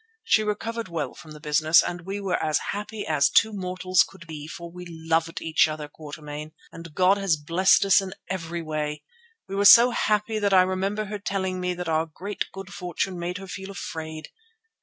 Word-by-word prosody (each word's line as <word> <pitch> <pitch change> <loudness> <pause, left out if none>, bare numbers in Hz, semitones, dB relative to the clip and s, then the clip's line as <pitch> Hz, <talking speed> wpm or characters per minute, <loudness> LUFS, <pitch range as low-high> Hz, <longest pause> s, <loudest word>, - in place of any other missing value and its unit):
She 450 - +4
recovered 225 +2 -3
well 160 -6 -3
from 160 - -13
the 155 0 -10
business 155 +2 +4
and 175 0 -5
we 200 +1 -3
were 195 -3 -1
as 155 -1 +2
happy 210 +1 -5
as 140 -3 +3
two 220 +7 +4
mortals 185 -1 +1
could 190 -3 -4
be, 155 -2 -8
for 170 +2 -8
we 180 +1 -9
loved 165 0 -1
each 160 -1 +3
other, 155 -1 -5
Quatermain, 150 0 -9 0.2
and 165 -2 -11
God 185 +2 +4
has 195 -6 +2
blessed 170 +6 +3
us 195 0 +6
in 190 -1 -7
every 170 -2 -4
way; 150 -1 -3 0.4
we - - -8
were 200 +1 +1
so 235 +5 +9
happy 215 -1 0
that 200 -2 +2
I 185 - +7
remember 195 +3 -1
her 210 +1 -5
telling 190 -2 -2
me 180 0 -1
that 180 0 -5
our 160 0 +1
great 195 +6 -5
good 195 0 -9
fortune 180 0 -3
made 175 +1 -3
her 195 - -8
feel 190 +1 -7
afraid. 160 -5 -6
180 Hz, 200 wpm, -25 LUFS, 160-195 Hz, 0.4 s, so